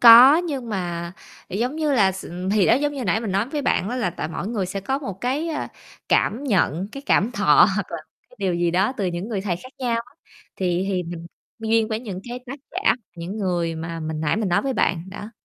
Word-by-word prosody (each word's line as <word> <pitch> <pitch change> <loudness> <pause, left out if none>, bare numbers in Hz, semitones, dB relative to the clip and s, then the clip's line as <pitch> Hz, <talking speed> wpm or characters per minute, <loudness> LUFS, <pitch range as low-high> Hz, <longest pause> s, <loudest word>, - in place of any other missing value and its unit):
có, 245 +5 +10
nhưng 285 -9 -2
mà, 175 -3 -3 0.4
giống 245 - -1
như 305 -2 +1
là, 195 -7 +4
s 190 - -7
ừm, 180 +2 -4
thì 205 -2 +4
đó, 225 - +6
giống 290 +2 +1
như 265 -4 -4
nãy 200 +4 +2
mình 215 -5 -3
nói 200 +6 +1
với 290 0 -2
bạn 200 - +1
á 250 - -2
là 215 -8 0
tại 170 - -4
mỗi 175 +4 -4
người 205 -6 -1
sẽ 195 +1 -4
có 265 +8 -1
một, 200 -9 -6
cái, 280 +7 -1
ờ, 305 - -2 0.4
cảm 240 +7 +2
nhận, 190 - +1
cái, 275 - -7
cảm 225 - +3
thọ 195 -7 +6
hoặc 205 - -1
là, - - -1 0.3
cái - - -19
điều 190 -3 0
gì 170 0 +1
đó 190 +8 +2
từ 195 - -1
những 175 +4 -3
người 205 -4 -2
thầy 185 -4 -1
khác 255 +8 -13
nhau 245 -3 0
á, - - -21 0.4
thì 180 0 0
thì 185 -2 0
mình 170 0 -7 0.3
duyên 225 0 +2
với 220 0 -2
những, 195 -6 -6
cái, 245 +1 -4
tác 275 +4 -6
giả, 375 +3 +2 0.2
những 175 +5 -5
người 175 -4 0
mà 165 +1 -5
mình 155 0 -3
nãy 160 +6 +1
mình 215 -3 0
nói 175 - +2
với 275 - 0
bạn, 170 -2 +1
đó. 205 +2 -8
200 Hz, 250 wpm, -23 LUFS, 180-245 Hz, 0.4 s, có